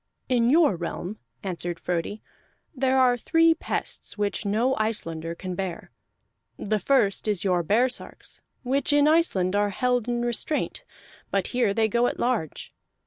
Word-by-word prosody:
"In 240 Hz, -2 st, +2 dB
your 300 Hz, -, +4 dB
realm," 175 Hz, +4 st, -5 dB, 0.2 s
answered 175 Hz, -2 st, -4 dB
Frodi, 180 Hz, +4 st, -3 dB, 0.5 s
"there 265 Hz, -1 st, +1 dB
are 250 Hz, -2 st, +4 dB
three 330 Hz, +5 st, +4 dB
pests 325 Hz, -, -4 dB
which 205 Hz, 0 st, -1 dB
no 235 Hz, +6 st, +2 dB
Icelander 165 Hz, -7 st, -2 dB
can 185 Hz, +1 st, -5 dB
bear. 180 Hz, -1 st, -5 dB, 0.7 s
The 215 Hz, +1 st, -1 dB
first 220 Hz, -3 st, +2 dB
is 205 Hz, -4 st, 0 dB
your 180 Hz, -3 st, +2 dB
baresarks, 240 Hz, +8 st, -1 dB, 0.2 s
which 270 Hz, +3 st, +1 dB
in 290 Hz, 0 st, +4 dB
Iceland 205 Hz, -, +2 dB
are 205 Hz, 0 st, +2 dB
held 245 Hz, +2 st, 0 dB
in 240 Hz, 0 st, -1 dB
restraint, 240 Hz, +5 st, -2 dB, 0.5 s
but -, -, 0 dB
here 245 Hz, -4 st, +1 dB
they 220 Hz, +2 st, +2 dB
go 235 Hz, +3 st, +2 dB
at -, -, -3 dB
large. 235 Hz, -, -2 dB
220 Hz, 145 wpm, -25 LUFS, 190-255 Hz, 0.7 s, your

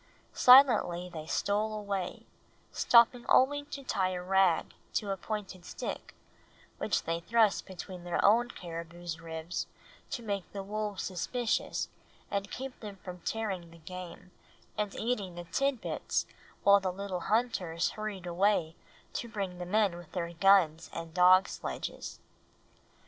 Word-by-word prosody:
Silently 225 Hz, -9 st, +6 dB
they 155 Hz, -1 st, -6 dB
stole 210 Hz, +5 st, 0 dB
away, 200 Hz, -3 st, -4 dB, 0.5 s
stopping 240 Hz, +1 st, +5 dB
only 290 Hz, +2 st, +4 dB
to 280 Hz, -1 st, -7 dB
tie 195 Hz, -7 st, 0 dB
a 180 Hz, -, -3 dB
rag 190 Hz, -2 st, +3 dB, 0.2 s
to 205 Hz, -2 st, 0 dB
a -, -, 0 dB
pointed 195 Hz, -3 st, -5 dB
stick, -, -, -6 dB, 0.6 s
which -, -, 0 dB
they 165 Hz, +1 st, -1 dB
thrust 220 Hz, +3 st, +2 dB
between 185 Hz, -1 st, -8 dB
their 175 Hz, -1 st, -2 dB
own 235 Hz, +4 st, +5 dB
caribou's 170 Hz, -2 st, -7 dB
ribs 165 Hz, +1 st, -4 dB, 0.4 s
to 240 Hz, -, -4 dB
make 200 Hz, -4 st, -3 dB
the 200 Hz, -1 st, -4 dB
wolves 210 Hz, -1 st, -3 dB
suspicious 215 Hz, +6 st, -1 dB, 0.4 s
and 200 Hz, 0 st, -1 dB
keep 265 Hz, 0 st, -6 dB
them 205 Hz, -3 st, -7 dB
from 180 Hz, -1 st, -7 dB
tearing 190 Hz, -4 st, -3 dB
the 170 Hz, -, -15 dB
game 180 Hz, +2 st, -9 dB, 0.4 s
and 210 Hz, -2 st, -2 dB
eating 210 Hz, -7 st, -2 dB
the 175 Hz, -, -6 dB
tidbits 270 Hz, +7 st, -1 dB, 0.4 s
while 200 Hz, 0 st, +7 dB
the 190 Hz, -1 st, -1 dB
little 190 Hz, -1 st, -4 dB
hunters 195 Hz, -7 st, +1 dB
hurried 215 Hz, -4 st, -5 dB
away 175 Hz, -2 st, +1 dB, 0.4 s
to 235 Hz, -, -4 dB
bring 195 Hz, -5 st, -4 dB
the 180 Hz, -, -5 dB
men 200 Hz, -2 st, +2 dB
with 175 Hz, -2 st, -13 dB
their 170 Hz, -2 st, -3 dB
guns 170 Hz, -3 st, +4 dB
and 165 Hz, -1 st, -6 dB
dog 185 Hz, +1 st, +6 dB
sledges. -, -, -6 dB
195 Hz, 140 wpm, -31 LUFS, 175-215 Hz, 0.6 s, while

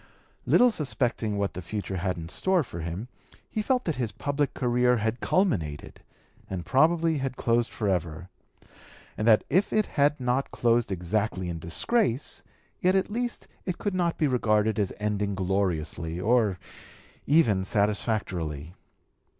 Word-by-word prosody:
Little 245 Hz, 0 st, +6 dB
suspecting 120 Hz, -, -1 dB
what 100 Hz, -1 st, -1 dB
the 90 Hz, -, -6 dB
future 95 Hz, +2 st, -4 dB
had 90 Hz, 0 st, -1 dB
in 80 Hz, -1 st, -6 dB
store 185 Hz, -, +1 dB
for 85 Hz, -9 st, -8 dB
him, 85 Hz, +7 st, -5 dB, 0.4 s
he 215 Hz, -, -2 dB
felt 255 Hz, +3 st, 0 dB
that 160 Hz, -5 st, -1 dB
his 120 Hz, -4 st, -1 dB
public 145 Hz, 0 st, -2 dB
career 125 Hz, 0 st, +2 dB
had 110 Hz, +2 st, -1 dB
culminated 90 Hz, -, -1 dB, 0.5 s
and 90 Hz, -3 st, -4 dB
probably 160 Hz, +2 st, +3 dB
had 130 Hz, -1 st, -3 dB
closed 120 Hz, 0 st, +1 dB
forever, 90 Hz, -5 st, -2 dB, 0.9 s
and 105 Hz, -, -2 dB
that 110 Hz, -2 st, +6 dB
if 190 Hz, +3 st, +2 dB
it 215 Hz, -1 st, +2 dB
had 145 Hz, 0 st, +1 dB
not 125 Hz, +2 st, 0 dB
closed 120 Hz, -2 st, +1 dB
exactly 95 Hz, +1 st, -1 dB
in 85 Hz, -1 st, -4 dB
disgrace, 130 Hz, -, 0 dB, 0.4 s
yet 185 Hz, +1 st, +3 dB
at 190 Hz, +1 st, +1 dB
least 240 Hz, +2 st, -3 dB, 0.2 s
it 180 Hz, -2 st, -3 dB
could 205 Hz, -, -2 dB
not 175 Hz, -2 st, 0 dB
be 155 Hz, -, +2 dB
regarded 110 Hz, -5 st, +2 dB
as 100 Hz, -3 st, 0 dB
ending 105 Hz, -1 st, -1 dB
gloriously 90 Hz, -4 st, -1 dB
or 110 Hz, -2 st, +2 dB, 0.7 s
even 130 Hz, -11 st, +4 dB
satisfactorily. 95 Hz, -, -1 dB
110 Hz, 145 wpm, -27 LUFS, 95-145 Hz, 0.9 s, Little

